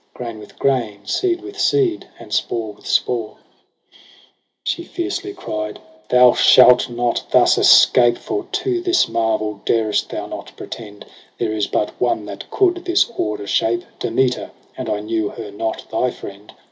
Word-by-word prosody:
Grain 115 -3 -6
with 105 - -14
grain, 115 -7 -1
seed 355 - 0
with 395 +2 -10
seed, 375 -5 +1
and 110 -3 -10
spore 110 -2 -1
with - - -15
spore. 115 -3 0
.7 - - -28 1.3
She 340 - -2
fiercely 375 +3 -4
cried 105 - -5 0.2
' 105 0 -31
Thou 125 -1 +6
shalt 125 0 +6
not 120 0 -1
thus - - +5
escape 120 -1 +6
j - - -15
For 400 +1 -4
to 365 -1 -1
this 355 0 +2
marvel 110 -2 -1
dar'st 110 -2 0
thou - - -5
not - - -8
pretend. 105 -2 -9 0.3
There 115 -2 -1
is 105 -2 -1
but 105 - -2
one 120 -4 0
that 100 -1 -9
coud 355 -2 +1
this 350 -8 +2
order 105 -1 -3
shape, 115 +3 0 0.2
Demeter, 125 +2 0
— - - -33
but - - -5
I 105 - -1
knew 110 -1 -2
her 110 -3 -8
not 110 +2 -4
thy 125 +3 +1
friend. 100 -3 -10
115 Hz, 170 wpm, -19 LUFS, -, 1.3 s, Thou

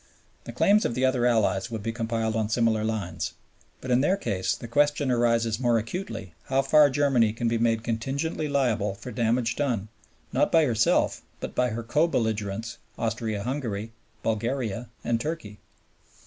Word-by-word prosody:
The - - -6
claims 210 +2 +4
of 115 - -1
the 130 - +2
other 130 -2 +2
Allies 110 -2 +2
would 110 -3 -5
be 115 - -1
compiled 115 -1 -2
on 110 -2 0
similar 110 -1 +2
lines. 110 -6 -3 0.5
But 130 - -4
in 125 +1 +4
their 185 +7 +2
case 100 - -1
the 120 - -8
question 145 +2 +2
arises 115 -2 +2
more 120 -2 +3
acutely 110 - -5
how 135 +1 +1
far 145 +2 +6
Germany 130 -6 +2
can 115 +1 -2
be 115 0 +1
made 115 -1 +1
contingently 135 +8 -2
liable 120 -8 +1
for 125 +5 -8
damage 115 0 +1
done, 120 -8 -1 0.4
not - - +2
by 165 -2 +5
herself, 115 -4 +2 0.2
but - - -5
by 125 0 +1
her 115 +1 -4
co 150 +8 +2
belligerents, 110 -5 -2 0.2
Austria 110 -2 -2
Hungary, 115 -5 -3 0.3
Bulgaria, 115 +1 -2
and 115 -1 0
Turkey. 150 -10 -5
115 Hz, 165 wpm, -26 LUFS, 110-130 Hz, 0.5 s, far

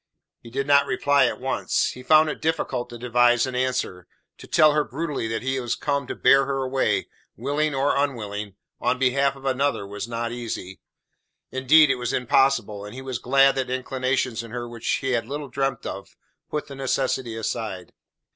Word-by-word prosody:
He 115 - -13
did 135 +3 -2
not 140 0 +4
reply 140 -2 +3
at - - -4
once. 130 +1 0
He 125 - -10
found 155 +4 +5
it 150 - -4
difficult 135 -6 -1
to 120 - -8
devise 120 0 +3
an 130 - -5
answer. 125 -8 -2 0.3
To - - -11
tell 155 -1 +5
her 150 0 +2
brutally 140 -1 -3
that 115 +1 -3
he 130 0 -1
was 120 -2 -2
come 140 -2 -2
to - - -4
bear 135 0 +4
her 135 -1 -1
away, 130 0 0 0.3
willing 145 +4 -1
or 135 +1 +1
unwilling, 105 -8 -2 0.2
on 125 +1 +1
behalf 135 +2 +2
of 135 0 -13
another, 135 -4 0
was 100 +2 -6
not 115 0 -3
easy. 115 -6 -6 0.7
Indeed, 140 +3 +5
it 135 - 0
was 120 -1 -3
impossible, 125 -5 +2
and 105 +3 -9
he 130 - -7
was 130 -3 -4
glad 135 +2 +4
that 130 -1 -1
inclinations 130 -1 -1
in 115 - -10
her 120 +1 -5
which 120 -1 -8
he 135 -1 0
had 115 -2 0
little 145 +1 -5
dreamt 135 -1 -2
of, 100 - -7 0.3
put 150 - -3
the 140 - -10
necessity 130 -3 -1
aside. 110 -4 -4
130 Hz, 190 wpm, -24 LUFS, 120-140 Hz, 0.7 s, found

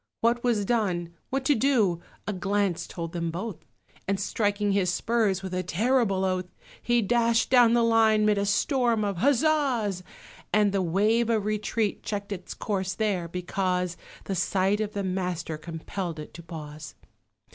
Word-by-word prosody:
What 235 +1 +2
was 225 -5 +1
done 185 -7 0 0.2
what 270 0 -2
to 290 - +5
do 220 -9 +2 0.2
a 210 - -2
glance 195 -1 -1
told 170 -1 -6
him 170 -1 -1
both; 180 +3 -4 0.5
And, 195 0 0
striking 205 0 0
his 195 -3 +2
spurs, 205 -2 0
with 190 -1 -5
a 185 - 0
terrible 195 +1 +1
oath 185 -1 -1 0.3
He 240 -1 +2
dashed 230 +2 +2
down 245 -3 +6
the 235 - +4
line 220 -2 +4
'mid 210 -1 +3
a 200 - 0
storm 235 +1 +2
of 200 -3 -2
huzzahs, 265 - +2 0.5
And 210 -1 +3
the 195 -1 +1
wave 210 +7 +2
of 220 -3 +1
retreat 215 0 -1
checked 205 -1 -4
its 185 -3 -6
course 190 -3 -2
there, 200 -6 0
because 180 0 -1 0.3
The 195 - -3
sight 195 +2 +1
of 210 -1 -3
the 200 - -2
Master 180 -3 -2
compelled 165 +2 -5
it 150 - -9
to 170 - -9
pause. 155 -2 -9
200 Hz, 165 wpm, -27 LUFS, 180-225 Hz, 0.5 s, down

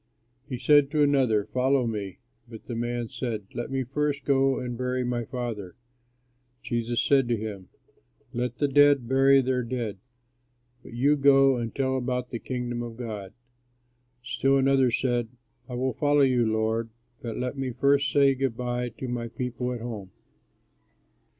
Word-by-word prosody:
He 125 - -3
said 145 +1 +4
to 150 0 +2
another, 130 -8 +2
"Follow 130 0 +1
me"; 105 -4 -4 0.3
but 110 -2 -11
the 120 - -6
man 120 0 -2
said, 110 -4 -4
"Let 120 - -4
me 135 0 -1
first 140 +2 -2
go 135 -1 +3
and 125 -1 -4
bury 125 +1 -1
my 120 -1 -2
father." 115 -8 -5 0.9
Jesus 120 -1 -1
said 135 -3 +3
to 120 -1 +1
him, 105 -3 -7 0.6
"Let 120 0 -2
the 145 - +1
dead 140 -2 +4
bury 135 +1 +5
their 130 0 0
dead, 115 -4 -4 0.8
but - - -13
you 140 +5 +3
go 135 -1 +5
and 115 -2 -4
tell 130 -1 0
about 125 -1 -3
the 115 - -4
Kingdom 120 -1 -4
of 115 -1 -7
God." 105 -5 -6 0.9
Still 135 +2 +1
another 135 -1 +3
said, 120 0 0 0.4
"I 125 - -5
will 130 +1 -1
follow 145 -1 +2
you, 125 -4 +3
Lord, 110 +1 0 0.3
but 115 -2 -5
let 125 +1 -3
me 135 -1 -3
first 140 +3 +2
say 140 -1 +4
good 130 -3 -2
by 125 0 -2
to 130 - -5
my 120 -1 -3
people 125 +1 -4
at 120 -2 -5
home." 110 -5 -6
125 Hz, 165 wpm, -26 LUFS, 115-135 Hz, 0.9 s, bury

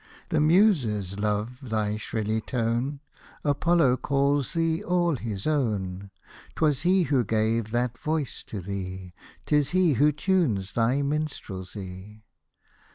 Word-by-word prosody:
The 160 -3 +1
Muses 145 - +3
love 105 +4 -1
thy 105 -1 0
shrilly 110 0 -2
tone; 120 +5 -1 0.4
Apollo 145 -2 +3
calls 140 -1 +1
thee 165 -1 0
all 175 -2 +1
his 110 -5 -5
own; 100 -10 -1 0.5
'Twas 150 -3 +2
he 185 +2 +3
who 140 -6 +2
gave 110 +1 0
that 120 0 -1
voice 155 -3 -2
to 105 - -6
thee, 95 -1 -6 0.3
'Tis 150 -2 +2
he 180 -5 +4
who 145 +5 +4
tunes 150 - 0
thy 120 +5 +2
minstrelsy. 105 -8 -5
120 Hz, 120 wpm, -26 LUFS, 105-150 Hz, 0.5 s, he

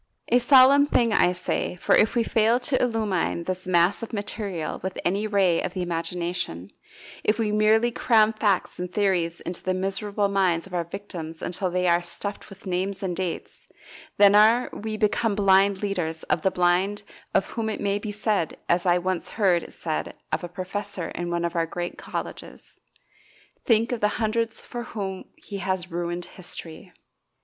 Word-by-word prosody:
A 245 - +5
solemn 270 +3 +6
thing, 235 -6 +2
I 180 - +4
say, 180 0 -2
for 180 - +1
if 215 - +3
we 235 - +3
fail 225 +2 +3
to 260 0 +1
illumine 215 -8 0
this 185 +1 -4
mass 175 +2 +3
of 230 - -6
material 200 -5 -3
with 190 0 -4
any 200 +4 +1
ray 195 -5 +2
of 180 - -4
the 185 - -1
imagination, 170 - -3 0.5
if 210 - +2
we 220 -2 0
merely 215 +3 +3
cram 220 -2 +3
facts 205 -6 0
and 180 0 -4
theories 180 -4 0
into 175 0 -6
the 185 0 -1
miserable 200 +2 -1
minds 185 -4 +1
of 195 - -14
our 175 -1 -1
victims 170 -3 -7
until 185 +1 -1
they 180 0 0
are 170 0 +4
stuffed 195 +3 -6
with 195 0 -14
names 190 +2 -2
and 180 -2 -2
dates, 180 -2 -5 0.5
then 200 -1 +7
are 220 +4 +5
we 215 0 -4
become 210 0 +1
blind 195 0 +3
leaders 170 -5 -2
of 160 - 0
the 190 - +3
blind 185 +3 +1 0.3
of 195 - +2
whom 225 -1 -3
it 215 - -4
may 200 0 0
be 210 0 -5
said, 205 -5 -1
as 175 +1 +1
I 175 0 +5
once 180 0 -2
heard 185 -5 +3
it - - -11
said 160 -2 -4
of - - -1
a 175 - -5
professor 185 0 -5
in 175 0 -4
one 170 0 -1
of 170 +1 -3
our 165 -1 +1
great 175 +1 -5
colleges, - - -7 0.9
"Think 230 0 +3
of 245 - -1
the 210 - +3
hundreds 225 +1 0
for 240 - -6
whom 195 -5 -5
he 200 - -8
has 185 -2 -2
ruined 175 +1 -3
history." 175 -1 -9
195 Hz, 180 wpm, -25 LUFS, 175-215 Hz, 0.9 s, then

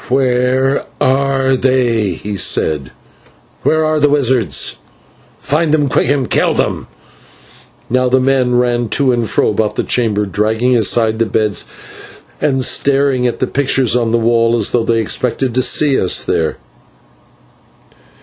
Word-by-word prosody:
"Where 130 +1 +1 0.2
are 135 0 +1
they?" 120 -6 0
he 105 +4 -6
said. 75 -7 0 0.7
"Where 160 0 +1
are 155 0 0
the 145 0 +3
wizards? 130 - 0 0.6
Find 150 +3 -1
them 150 -2 +1
quick 125 - 0
and 140 -3 0
kill - - +1
them." - - -2 1.0
Now 130 +1 +1
the 130 +1 +3
men 130 -1 +1
ran 120 -1 0
to 140 -2 +2
and 120 -2 -1
fro - - +1
about 105 0 -1
the - - -1
chamber, 105 -4 0
dragging 110 +5 0
aside 110 0 +1
the 115 - +1
beds 110 -2 -1 0.8
and 135 -3 +1
staring 135 -2 +1
at 120 - -3
the - - -1
pictures 130 -3 0
on 120 -2 0
the 120 - +2
walls 115 0 +2
as 110 -4 0
though 120 - +1
they 115 0 0
expected 125 +3 -1
to 130 - +1
see 140 +1 +2
us 90 - 0
there. 80 -1 -1
125 Hz, 150 wpm, -14 LUFS, 115-135 Hz, 1.0 s, the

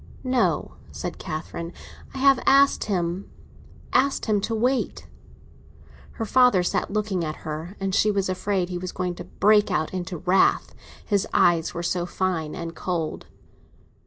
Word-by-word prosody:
"No," 255 -1 0
said - - -6
Catherine; 165 +2 -5 0.4
"I - - -9
have 270 -1 +5
asked 275 +1 +5
him—asked 195 +8 -2
him 210 -3 +1
to 225 +3 -2
wait." 250 +4 0 1.1
Her 225 - -4
father 250 -5 +4
sat - - -1
looking 205 -4 -1
at 155 0 -6
her, 160 +5 -5
and 195 -1 -2
she 210 - +3
was 200 -2 0
afraid 185 -1 -1
he 180 -1 -3
was 185 0 -5
going 180 -1 -2
to - - -8
break 210 0 +3
out 175 -3 -1
into 180 -1 -4
wrath; 180 +4 +2 0.3
his 200 -3 +1
eyes 170 -2 +3
were 170 - -3
so 175 0 -1
fine 175 -4 -2
and 165 -1 -6
cold. 170 -4 -3
185 Hz, 150 wpm, -24 LUFS, 175-215 Hz, 1.1 s, have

